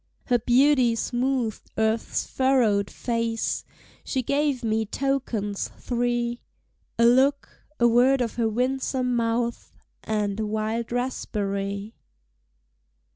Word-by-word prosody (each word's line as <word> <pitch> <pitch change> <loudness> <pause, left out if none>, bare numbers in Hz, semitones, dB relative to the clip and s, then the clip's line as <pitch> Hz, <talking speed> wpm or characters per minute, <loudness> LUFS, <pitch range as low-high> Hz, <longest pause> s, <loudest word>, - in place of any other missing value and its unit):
Her 245 -2 +2
beauty 250 0 +4
smoothed 245 -1 -1
earth's 220 +1 0
furrowed 240 -7 +2
face! 230 -1 -2 0.4
She 260 -2 -2
gave 280 -1 0
me 220 0 +1
tokens 225 -4 -2
three: 240 -1 -1 0.6
A 235 - +4
look, 265 +4 +2
a 240 - +5
word 250 +3 +4
of 235 -3 -1
her 230 -2 0
winsome 255 +1 0
mouth, 235 0 -1 0.3
And 210 -1 -1
a 220 - 0
wild 220 +2 -2
raspberry. 200 -4 -3
235 Hz, 105 wpm, -25 LUFS, 220-255 Hz, 0.6 s, a